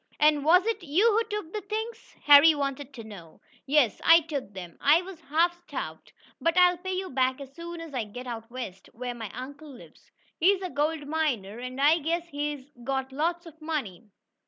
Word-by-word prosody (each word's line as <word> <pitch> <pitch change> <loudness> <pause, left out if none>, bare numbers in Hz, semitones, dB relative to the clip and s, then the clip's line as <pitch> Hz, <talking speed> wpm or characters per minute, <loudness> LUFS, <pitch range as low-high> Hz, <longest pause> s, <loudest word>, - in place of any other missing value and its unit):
"And 300 -1 +4
was 360 +5 +5
it 450 -2 -1
you 355 +9 +3
who 445 +2 +2
took 415 -6 -5
the 425 - -3
things?" 440 +3 -6
Harry 290 +2 +8
wanted 280 -1 -3
to 230 - -8
know. 190 -7 -12 0.3
"Yes, 270 -7 +3
I 330 +1 +7
took 285 -9 -5
them. 175 -3 -8
I 310 +5 +5
was 360 -3 -10
half 335 +3 +3
starved. 345 - -7 0.3
But 335 +1 +1
I'll 360 -1 +5
pay 375 +1 -4
you 375 0 -3
back 260 0 +1
as 275 -1 -10
soon 340 +1 -8
as 330 -3 -9
I 245 -4 -2
get 245 +5 -9
out 230 -2 -6
west, 230 -7 -8
where 245 +1 -5
my 225 -3 -7
uncle 285 +5 -9
lives. 255 -3 -15 0.3
He's 385 +3 +3
a 365 - -4
gold 295 +2 -1
miner, 250 -10 -1
and 255 +1 -6
I 300 +4 +5
guess 335 +3 -2
he's 290 -2 -4 0.2
got 265 0 -2
lots 340 +5 -1
of 320 -1 -14
money. 255 - -4
295 Hz, 200 wpm, -27 LUFS, 255-340 Hz, 0.3 s, Harry